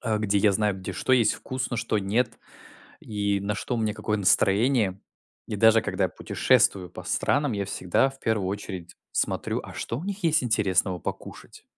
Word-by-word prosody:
а, 110 -3 0
где 100 -1 +1
я 100 0 +4
знаю, 105 -1 +1
где 95 - -6
что 130 - -1
есть 115 -4 +4
вкусно, 130 -2 -4
что 110 -1 0
нет, 115 +4 0 0.6
и 100 -2 -1
на 100 +1 -2
что 120 +4 -3
мне 110 -2 -1
какое 105 -1 -1
настроение. 100 +1 +2 0.5
И 105 - -4
даже 110 +1 +6
когда 95 -1 -1
я - - +1
путешествую 90 -3 +1
по - - -9
странам, 145 -3 +1
я 100 -1 -2
всегда 95 +8 +1
в 135 - -17
первую 105 -4 0
очередь 95 -3 -6 0.2
смотрю: - - -1
а - - -9
что 115 - -4
у 170 - -7
них 200 0 -5
есть 155 -5 +3
интересного 95 -5 +1
покушать? - - -8
105 Hz, 185 wpm, -26 LUFS, 100-120 Hz, 0.6 s, даже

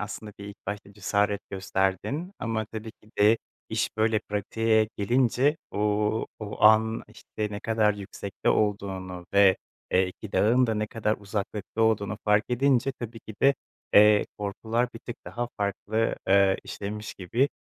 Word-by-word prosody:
aslında 105 0 -6
bir 100 - -8
ilk 100 0 -9
başta 100 0 -5
cesaret 100 0 0
gösterdin 95 - -1
ama 110 -1 -2
tabii 110 +1 -7
ki 105 - -24
de 110 +2 +5 0.3
iş 110 0 -1
böyle 110 0 +3
pratiğe 110 +1 +1
gelince, 125 +7 +2
ooo, 105 +1 0
o 105 -1 -7
an, 110 +1 +5
işte, 105 -1 -5
ne 105 0 -5
kadar 110 -2 +2
yüksekte 100 -1 -5
olduğunu 95 -4 -1
ve, 100 -2 +6 0.4
eee, 95 0 +4
2 100 +3 -9
dağın 125 +4 +4
da 110 - 0
ne 105 0 -1
kadar 110 -1 -1
uzaklıkta 100 +1 -3
olduğunu 110 -1 +1
fark 105 +1 +4
edince, 130 +1 +2
tabii 115 -1 -7
ki 110 - -10
de, 140 +1 +6 0.4
eee, 105 0 +7
korkular 110 +4 -1
bir 115 - -7
tık 120 - -8
daha 120 0 -4
farklı, 105 +2 -1
ııı, 95 0 +5
işlemiş 105 +2 -6
gibi 115 +10 0
105 Hz, 155 wpm, -27 LUFS, 100-115 Hz, 0.4 s, eee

